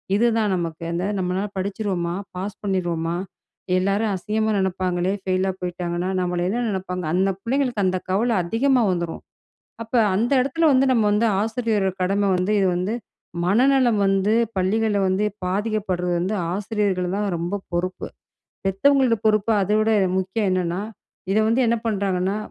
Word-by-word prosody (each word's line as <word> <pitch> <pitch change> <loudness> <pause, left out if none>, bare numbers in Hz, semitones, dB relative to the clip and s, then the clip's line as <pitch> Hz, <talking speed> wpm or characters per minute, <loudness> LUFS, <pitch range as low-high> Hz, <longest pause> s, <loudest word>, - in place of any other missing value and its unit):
இதுதான் 225 -3 +2
நமக்கு 165 -2 -4
அந்த 175 +2 -2 0.2
"நம்மளால 185 +2 -1
படிச்சிடுவோமா 190 -3 -2 0.2
பாஸ் 195 +3 -5
பண்ணிருவோமா 175 -4 -1 0.6
எல்லாரும் 200 +3 +1
அசிங்கமா 215 +4 -1
நினைப்பாங்களே 185 -1 0
ஃபெயிலா 190 0 0
போய்ட்டாங்கன்னா 175 0 -3
நம்மள 180 -1 -1
என்ன 240 +4 -1
நினைப்பாங்க." 180 -1 -4
அந்த 190 +2 +2
பிள்ளைங்களுக்கு 245 -3 0
அந்த 185 0 +1
கவல 230 +4 +2
அதிகமா 250 +6 +2
வந்துரும் 170 -2 -3 0.6
அப்போ 230 +2 -1 0.2
அந்த 230 +6 +1
இடத்துல 320 +6 +1
வந்து 265 +1 +4
நம்ம 225 -3 +2
வந்து 215 +3 +2
ஆசிரியர் 220 -2 0 0.2
கடமை 200 +2 +1
வந்து 185 +4 0
இது 195 - +3
வந்து 185 +5 -1 0.5
மனநலம் 245 +1 +3
வந்து 195 +2 +2 0.2
பள்ளிகள்ல 205 +3 +1
வந்து 190 +3 +1 0.2
பாதிக்கப்படுறது 190 -3 -1
வந்து 190 +4 -1 0.2
ஆசிரியர்கள் 195 -3 -1
தான் 205 0 -1
ரொம்ப 175 +4 -3
பொறுப்பு. 180 +2 -2 0.6
பெத்தவங்களோட 255 +5 +3
பொறுப்பு 215 +1 +3
அதை 210 +3 +1
விட 220 +1 +2 0.3
முக்கியம். 190 +2 -1
என்னன்னா 180 0 -1 0.5
இதை 215 - +3
வந்து 230 +3 +2
என்ன 230 +1 +2
பண்ணுறாங்கன்னா 195 -2 0
195 Hz, 140 wpm, -22 LUFS, 185-220 Hz, 0.6 s, வந்து